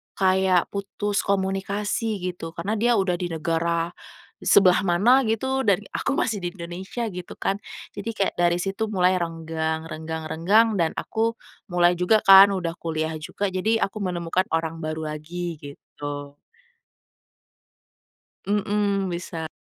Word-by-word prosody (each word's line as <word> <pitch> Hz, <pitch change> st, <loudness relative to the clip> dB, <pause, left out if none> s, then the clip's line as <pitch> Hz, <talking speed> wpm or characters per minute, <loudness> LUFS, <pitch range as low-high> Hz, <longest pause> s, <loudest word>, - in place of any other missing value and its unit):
kayak 190 Hz, -2 st, +2 dB
putus 200 Hz, +1 st, -2 dB
komunikasi 200 Hz, +3 st, -1 dB
gitu, 165 Hz, -2 st, -8 dB
karena 195 Hz, +6 st, -2 dB
dia 240 Hz, +2 st, +3 dB
udah 190 Hz, -4 st, +1 dB
di 180 Hz, -, -2 dB
negara 165 Hz, +1 st, -1 dB, 0.5 s
e -, -, -8 dB
sebelah 190 Hz, 0 st, +5 dB
mana 205 Hz, +10 st, +5 dB
gitu 265 Hz, +3 st, 0 dB
dan 200 Hz, 0 st, +3 dB
aku 275 Hz, -, -1 dB
masih 220 Hz, -6 st, 0 dB
di 175 Hz, 0 st, -5 dB
Indonesia 185 Hz, +6 st, -6 dB
gitu 180 Hz, -1 st, -8 dB
kan 195 Hz, +1 st, -1 dB, 0.3 s
jadi 205 Hz, +2 st, -6 dB
kayak 195 Hz, -, 0 dB
dari 175 Hz, 0 st, +3 dB
situ 195 Hz, +5 st, -2 dB
mulai 185 Hz, -3 st, +2 dB
renggang 160 Hz, -1 st, -3 dB
renggang 160 Hz, 0 st, -6 dB
renggang 205 Hz, +6 st, +3 dB
dan 165 Hz, -1 st, +1 dB
aku 225 Hz, +1 st, -1 dB, 0.3 s
mulai 175 Hz, -2 st, +3 dB
juga 210 Hz, +4 st, +3 dB
kan, 195 Hz, +1 st, +9 dB
udah 175 Hz, -3 st, -2 dB
kuliah 160 Hz, -1 st, -2 dB
juga 195 Hz, +6 st, -3 dB
jadi 215 Hz, +5 st, +1 dB
aku 195 Hz, +2 st, -3 dB
menemukan 180 Hz, -1 st, -1 dB
orang 165 Hz, 0 st, -2 dB
baru 155 Hz, -1 st, -4 dB
lagi, 165 Hz, +2 st, -5 dB
gitu. 145 Hz, 0 st, -8 dB, 2.1 s
Mmm, 205 Hz, -1 st, 0 dB
bisa. 170 Hz, -2 st, -5 dB
185 Hz, 140 wpm, -24 LUFS, 165-205 Hz, 2.1 s, kan